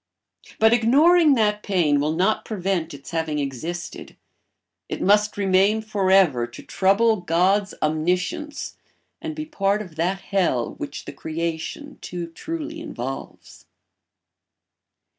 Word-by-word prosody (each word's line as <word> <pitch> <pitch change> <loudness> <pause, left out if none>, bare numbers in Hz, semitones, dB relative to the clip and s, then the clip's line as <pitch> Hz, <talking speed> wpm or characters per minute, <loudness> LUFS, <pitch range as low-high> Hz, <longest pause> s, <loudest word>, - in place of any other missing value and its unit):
But 220 +1 +5
ignoring 295 +7 +5
that 210 -3 +1
pain 170 -9 +2
will 150 +2 0
not 190 +6 +1
prevent 185 -5 -2
its 140 -1 -10
having 160 -2 -1
existed; 150 +5 -5 0.7
it - - -4
must 210 +2 +3
remain 195 +2 +3
for 205 -3 -1
ever 160 -12 +4
to 120 - -12
trouble 215 +4 +3
God's 185 +3 +1
omniscience 180 - -1 0.4
and 320 -1 -5
be 310 - -4
a - - -9
part 205 -9 0
of 180 -7 -9
that 185 +4 0
hell 175 - 0
which - - -6
the - - -7
creation 170 - -5
too 175 -1 -5
truly 320 - -5
involves. 135 - -7
195 Hz, 125 wpm, -23 LUFS, 165-220 Hz, 0.7 s, But